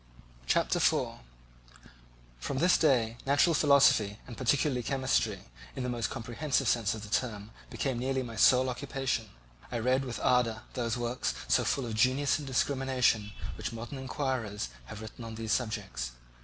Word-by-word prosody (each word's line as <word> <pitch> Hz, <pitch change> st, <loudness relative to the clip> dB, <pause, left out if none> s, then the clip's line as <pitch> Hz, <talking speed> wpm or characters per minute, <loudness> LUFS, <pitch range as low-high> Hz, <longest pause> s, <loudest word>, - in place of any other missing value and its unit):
Chapter -, -, +2 dB
4 -, -, +1 dB, 1.2 s
From 130 Hz, -, -3 dB
this 175 Hz, +6 st, +4 dB
day 120 Hz, -7 st, +2 dB
natural 145 Hz, +5 st, +3 dB
philosophy, 140 Hz, -9 st, +4 dB
and 120 Hz, -, -9 dB
particularly 130 Hz, +1 st, +1 dB
chemistry, 125 Hz, -6 st, 0 dB, 0.3 s
in 130 Hz, -, -3 dB
the 125 Hz, -, -2 dB
most 115 Hz, -1 st, -1 dB
comprehensive 130 Hz, +3 st, -1 dB
sense 115 Hz, -2 st, +2 dB
of 105 Hz, -, -8 dB
the -, -, -7 dB
term, 105 Hz, -1 st, -2 dB, 0.2 s
became 130 Hz, -4 st, -2 dB
nearly 130 Hz, +1 st, -1 dB
my 115 Hz, -2 st, -7 dB
sole 130 Hz, +3 st, +5 dB
occupation. 130 Hz, -3 st, -2 dB, 0.4 s
I 120 Hz, -, -1 dB
read 130 Hz, +3 st, +2 dB
with 125 Hz, -3 st, -5 dB
ardour 120 Hz, -2 st, +2 dB
those 120 Hz, -1 st, -1 dB
works, 120 Hz, +1 st, -2 dB
so -, -, +3 dB
full 135 Hz, -, 0 dB
of 115 Hz, -, -4 dB
genius 130 Hz, +6 st, +2 dB
and 145 Hz, -, -7 dB
discrimination, 130 Hz, -5 st, +1 dB, 0.2 s
which -, -, -4 dB
modern 120 Hz, +4 st, -6 dB
inquirers 130 Hz, -, -3 dB, 0.2 s
have 105 Hz, -, -9 dB
written 110 Hz, +2 st, -9 dB
on 115 Hz, -1 st, -7 dB
these 110 Hz, -1 st, -4 dB
subjects. 100 Hz, -, -2 dB
125 Hz, 155 wpm, -30 LUFS, 110-135 Hz, 1.2 s, sole